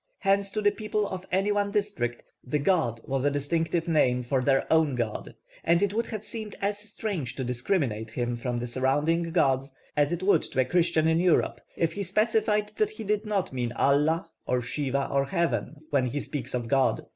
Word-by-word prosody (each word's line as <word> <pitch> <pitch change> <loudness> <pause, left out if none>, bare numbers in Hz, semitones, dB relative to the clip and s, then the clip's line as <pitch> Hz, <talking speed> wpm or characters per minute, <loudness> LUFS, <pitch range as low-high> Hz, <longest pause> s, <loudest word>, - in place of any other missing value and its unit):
Hence 195 0 +2
to 215 - -1
the 205 - +5
people 215 -1 -2
of 185 -1 -6
any 195 +3 +2
one 205 0 +1
district 200 - -2 0.2
'the 135 +4 -1
god' 145 - +1
was 135 -1 -1
a 145 - +4
distinctive 160 +4 -1
name 125 -6 +3
for 130 +2 0
their 135 +1 +2
own 160 -4 +3
god; 115 -3 -3 0.3
and 170 +3 +3
it 200 0 +1
would 230 +2 0
have 215 -1 -5
seemed 220 -3 -5
as 205 +1 -1
strange 200 - -4
to 135 - -3
discriminate 125 - -1
him 120 +1 -2
from 120 +1 -3
the 120 - -2
surrounding 145 +7 +1
gods, 135 -5 +2 0.2
as 145 0 +2
it 175 +1 -2
would 200 - +4
to - - -4
a - - +1
Christian 165 +1 +2
in 160 0 +3
Europe 175 -1 +2 0.2
if 165 - +1
he 200 - -4
specified 210 +2 +1
that 215 - +2
he 215 +1 -8
did 210 +1 -1
not 200 -8 -1
mean 120 -2 -2
Allah 150 +5 +2 0.2
or 125 -1 +1
Siva 140 +1 -1
or 140 0 +1
Heaven 165 -1 -1
when 135 -3 +2
he 145 +4 -2
speaks 135 -3 -4
of 120 -2 -2
God. 135 +1 +2
160 Hz, 205 wpm, -27 LUFS, 130-200 Hz, 0.3 s, the